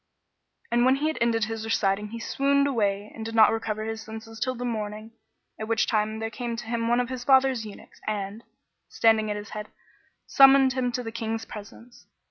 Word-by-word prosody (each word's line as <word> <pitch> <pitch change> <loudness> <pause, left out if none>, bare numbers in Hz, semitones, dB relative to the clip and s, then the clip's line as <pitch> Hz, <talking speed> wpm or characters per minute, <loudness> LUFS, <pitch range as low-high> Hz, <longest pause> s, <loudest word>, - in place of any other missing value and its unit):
And 240 0 +3
when 260 +1 +5
he 285 +3 -2
had 315 - -4
ended 230 -1 +2
his 220 0 -3
reciting 210 -2 0
he 230 +2 -7
swooned 280 +4 +1
away 205 -6 -1
and 225 - -7
did 225 0 -5
not 220 -1 +7
recover 215 -1 -3
his 225 0 -4
senses 220 0 -9
till 255 +3 -1
the 245 +1 -5
morning, 215 -1 -4 0.5
at 220 - -4
which 225 -1 +2
time 215 0 0
there 225 0 -4
came 235 +1 -4
to 230 -1 -7
him 230 0 -2
one 240 +1 +3
of 250 0 -1
his 255 -1 -5
father's 265 -3 +3
eunuchs 205 - -14
and, 210 +1 -3 0.5
standing 220 -1 +3
at 210 - -2
his 205 0 -8
head, 210 0 -6 0.6
summoned 270 -1 +6
him 255 -2 -1
to 250 - -2
the 225 - -5
King's 225 -1 -4
presence. 225 +3 -12
225 Hz, 205 wpm, -26 LUFS, 215-245 Hz, 0.6 s, not